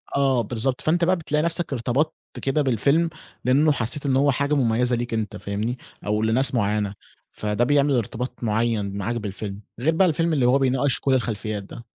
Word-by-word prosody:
آه، 135 Hz, -3 st, +3 dB
بالضبط، 120 Hz, +3 st, -2 dB
فأنت 170 Hz, +2 st, +1 dB
بقى 185 Hz, +2 st, +3 dB
بتلاقي 150 Hz, -3 st, -1 dB
نفسك 170 Hz, -2 st, -1 dB
ارتبطت 130 Hz, +5 st, 0 dB, 0.3 s
كده 135 Hz, +2 st, +1 dB
بالفيلم، 140 Hz, +6 st, +2 dB, 0.4 s
لأنه 145 Hz, +4 st, +4 dB
حسيت 135 Hz, +3 st, -1 dB
إن 135 Hz, -2 st, +2 dB
هو 140 Hz, +2 st, +4 dB
حاجة 140 Hz, +3 st, 0 dB
مميزة 120 Hz, -1 st, +2 dB
ليك 120 Hz, 0 st, -3 dB
أنت 110 Hz, -3 st, -2 dB
فاهمني؟ 105 Hz, +5 st, -3 dB, 0.3 s
أو 105 Hz, +1 st, 0 dB
لناس 125 Hz, +4 st, +3 dB
معينة، 105 Hz, -2 st, 0 dB, 0.4 s
فده 105 Hz, +2 st, -1 dB
بيعمل 145 Hz, +2 st, +3 dB
إرتباط 120 Hz, +2 st, -3 dB
معين 110 Hz, -3 st, 0 dB
معاك 110 Hz, +4 st, -2 dB
بالفيلم، 100 Hz, -2 st, -5 dB, 0.2 s
غير 160 Hz, +6 st, +1 dB
بقى 190 Hz, +2 st, +4 dB
الفيلم 165 Hz, 0 st, +1 dB
اللي 130 Hz, -5 st, +2 dB
هو 125 Hz, +2 st, +5 dB
بيناقش 130 Hz, 0 st, +1 dB
كل 135 Hz, -, +1 dB
الخلفيات 110 Hz, -4 st, -1 dB
ده. 115 Hz, +4 st, -11 dB
125 Hz, 180 wpm, -23 LUFS, 110-145 Hz, 0.4 s, هو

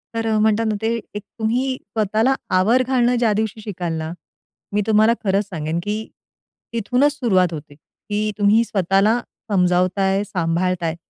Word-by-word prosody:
तर 225 Hz, 0 st, -1 dB
अ, 220 Hz, -1 st, +1 dB
म्हणतात 220 Hz, +1 st, +2 dB
ना, 215 Hz, -1 st, 0 dB
ते 225 Hz, +1 st, 0 dB, 0.2 s
एक 205 Hz, -, -5 dB, 0.2 s
तुम्ही 250 Hz, +4 st, 0 dB
स्वतःला 220 Hz, +5 st, 0 dB, 0.2 s
आवर 235 Hz, +7 st, +3 dB
घालणं 250 Hz, -2 st, +2 dB
ज्या 230 Hz, -3 st, +2 dB
दिवशी 220 Hz, +1 st, -2 dB
शिकाल 180 Hz, -5 st, -4 dB
ना, 160 Hz, 0 st, -4 dB, 0.6 s
मी 210 Hz, -, +2 dB
तुम्हाला 220 Hz, +1 st, +4 dB
खरंच 200 Hz, 0 st, +1 dB
सांगेन, 160 Hz, -2 st, -3 dB
की 210 Hz, +2 st, -3 dB, 0.7 s
तिथूनच 250 Hz, +6 st, +2 dB
सुरुवात 190 Hz, -, +1 dB
होते. 150 Hz, -2 st, -9 dB
की 210 Hz, +7 st, -4 dB
तुम्ही 210 Hz, +3 st, +4 dB
स्वतःला 195 Hz, +2 st, +2 dB, 0.3 s
समजावताय, 185 Hz, +1 st, +2 dB
सांभाळताय 170 Hz, -2 st, -1 dB
210 Hz, 145 wpm, -21 LUFS, 185-225 Hz, 0.7 s, तुम्हाला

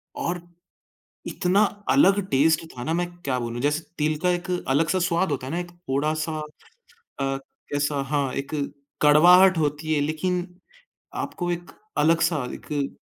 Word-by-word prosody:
और, 175 Hz, 0 st, -2 dB, 0.9 s
इतना 190 Hz, +2 st, +2 dB, 0.3 s
अलग 205 Hz, -8 st, +5 dB
टेस्ट 155 Hz, +4 st, +3 dB
था 120 Hz, -, -7 dB
ना, 160 Hz, -, -1 dB
मैं 175 Hz, +1 st, 0 dB, 0.2 s
क्या 130 Hz, -2 st, 0 dB
बोलूँ? 120 Hz, 0 st, -4 dB
जैसे 150 Hz, +4 st, +1 dB, 0.2 s
तिल 155 Hz, 0 st, +1 dB
का 180 Hz, -, +3 dB
एक 175 Hz, +1 st, -3 dB, 0.2 s
अलग-सा 160 Hz, +7 st, +2 dB
स्वाद 170 Hz, -1 st, +1 dB
होता 130 Hz, -2 st, -3 dB
है -, -, -5 dB
ना, 175 Hz, -, 0 dB
एक 175 Hz, 0 st, -6 dB
थोड़ा-सा 155 Hz, -1 st, -2 dB, 0.8 s
अ, 135 Hz, 0 st, 0 dB, 0.3 s
कैसा? 145 Hz, 0 st, 0 dB
हाँ, 135 Hz, -1 st, -1 dB
एक 140 Hz, -, -4 dB, 0.5 s
कड़वाहट 175 Hz, +5 st, +7 dB
होती 155 Hz, +1 st, 0 dB
है 150 Hz, -, +2 dB
लेकिन 175 Hz, +4 st, -1 dB, 0.7 s
आपको 175 Hz, -1 st, -3 dB
एक 175 Hz, 0 st, -5 dB, 0.3 s
अलग-सा 165 Hz, 0 st, +3 dB
एक 145 Hz, -2 st, -4 dB
155 Hz, 145 wpm, -24 LUFS, 145-175 Hz, 0.9 s, कड़वाहट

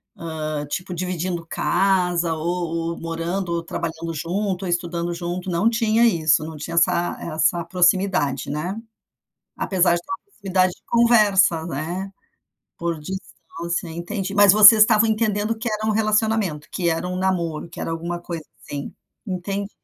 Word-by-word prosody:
hã, 155 Hz, -2 st, -4 dB
tipo 180 Hz, +5 st, -4 dB
dividindo 175 Hz, -1 st, -3 dB
casa 180 Hz, -3 st, +1 dB
ou 165 Hz, 0 st, -2 dB
ou -, -, -10 dB
morando 170 Hz, +3 st, -3 dB
ou 170 Hz, -, -2 dB
trabalhando 165 Hz, 0 st, -4 dB
junto 185 Hz, +4 st, -2 dB
ou -, -, -3 dB
estudando 170 Hz, 0 st, -2 dB
junto 175 Hz, +2 st, -4 dB
não 180 Hz, +5 st, +1 dB
tinha 230 Hz, 0 st, +2 dB
isso, 160 Hz, -8 st, +3 dB
não 160 Hz, 0 st, -7 dB
tinha 150 Hz, +2 st, -6 dB
essa 175 Hz, 0 st, +2 dB
essa 165 Hz, +1 st, 0 dB
proximidade, 180 Hz, -6 st, +1 dB
né? 175 Hz, +8 st, -3 dB, 0.8 s
Apesar 180 Hz, -2 st, +2 dB
de 175 Hz, -, -1 dB
ter -, -, -17 dB
uma 230 Hz, -, -5 dB
proximidade 190 Hz, -, 0 dB
de -, -, -30 dB
conversa, 210 Hz, -8 st, +4 dB
né? 175 Hz, +6 st, -4 dB, 0.6 s
Por 170 Hz, -1 st, -2 dB
distância, 170 Hz, 0 st, -6 dB
entendi, 185 Hz, +4 st, -4 dB
mas 205 Hz, -1 st, +7 dB
vocês 215 Hz, +1 st, +9 dB
estavam 220 Hz, +1 st, +4 dB
entendendo 215 Hz, 0 st, 0 dB
que 235 Hz, +2 st, -3 dB
era 215 Hz, 0 st, -2 dB
um 220 Hz, -, +2 dB
relacionamento, 215 Hz, -7 st, +1 dB
que 175 Hz, -2 st, -1 dB
era 165 Hz, +2 st, -1 dB
um 180 Hz, -, -3 dB
namoro, 175 Hz, -4 st, -1 dB
que 165 Hz, -, -10 dB
era -, -, -3 dB
alguma 170 Hz, +1 st, -4 dB
coisa 170 Hz, -2 st, -6 dB, 0.2 s
assim, 140 Hz, -1 st, -6 dB, 0.3 s
entendi. 195 Hz, +1 st, -4 dB
175 Hz, 155 wpm, -22 LUFS, 165-200 Hz, 0.8 s, vocês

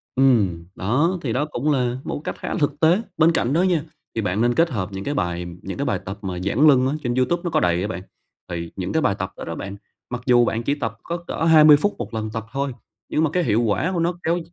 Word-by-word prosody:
Ừm, 105 Hz, -11 st, +3 dB
đó, 145 Hz, -, +1 dB
thì 120 Hz, -5 st, -2 dB
đó 145 Hz, +4 st, +1 dB
cũng 150 Hz, +4 st, 0 dB
là 125 Hz, -3 st, 0 dB
một -, -, -3 dB
cái -, -, -3 dB
cách -, -, -20 dB
khá -, -, -4 dB
là -, -, -2 dB
thực 145 Hz, -, 0 dB
tế. 170 Hz, +6 st, +4 dB, 0.2 s
Bên 160 Hz, +1 st, +5 dB
cạnh 130 Hz, -4 st, 0 dB
đó 165 Hz, -, +3 dB
nha, 175 Hz, -5 st, +2 dB, 0.3 s
thì 115 Hz, -, 0 dB
bạn 100 Hz, +1 st, -1 dB
nên 120 Hz, 0 st, +2 dB
kết 165 Hz, +1 st, +3 dB
hợp 105 Hz, -, -3 dB
những 95 Hz, 0 st, -5 dB
cái 145 Hz, -, -2 dB
bài 90 Hz, -8 st, -2 dB, 0.2 s
những 95 Hz, -, -6 dB
cái 140 Hz, -, -1 dB
bài 125 Hz, -, 0 dB
tập 95 Hz, +2 st, -5 dB
mà 95 Hz, -3 st, -4 dB
giãn 105 Hz, +11 st, +3 dB
lưng 130 Hz, -3 st, +5 dB
á, 135 Hz, -, 0 dB
trên 120 Hz, -1 st, -1 dB
YouTube 130 Hz, +7 st, +1 dB
nó 175 Hz, -, -1 dB
có -, -, +2 dB
đầy 90 Hz, 0 st, +1 dB
á 100 Hz, -, -1 dB
bạn. 100 Hz, -, -5 dB, 0.5 s
Thì 85 Hz, -1 st, -5 dB
những 95 Hz, -1 st, -4 dB
cái 160 Hz, -, +2 dB
bài 100 Hz, -, +2 dB
tập 95 Hz, +1 st, -3 dB
đó -, -, -7 dB
đó 85 Hz, -, -5 dB
bạn, 100 Hz, +3 st, -6 dB, 0.3 s
mặc 125 Hz, 0 st, -4 dB
dù 120 Hz, -2 st, +5 dB
bạn 115 Hz, 0 st, -1 dB
chỉ 140 Hz, -, 0 dB
tập 115 Hz, -7 st, -4 dB
có 170 Hz, -, -3 dB
cỡ -, -, -3 dB
20 155 Hz, -2 st, +8 dB
phút 205 Hz, +8 st, 0 dB
1 115 Hz, -2 st, -6 dB
lần 110 Hz, -1 st, -3 dB
tập 115 Hz, -1 st, -4 dB
thôi, 140 Hz, 0 st, -2 dB, 0.4 s
nhưng 155 Hz, -, +1 dB
mà 160 Hz, -, +2 dB
cái 180 Hz, -, +2 dB
hiệu 115 Hz, -5 st, +2 dB
quả 115 Hz, -, +1 dB
của 175 Hz, -, -1 dB
nó 170 Hz, +2 st, +1 dB
kéo 170 Hz, +2 st, +1 dB
125 Hz, 285 wpm, -22 LUFS, 100-155 Hz, 0.5 s, 20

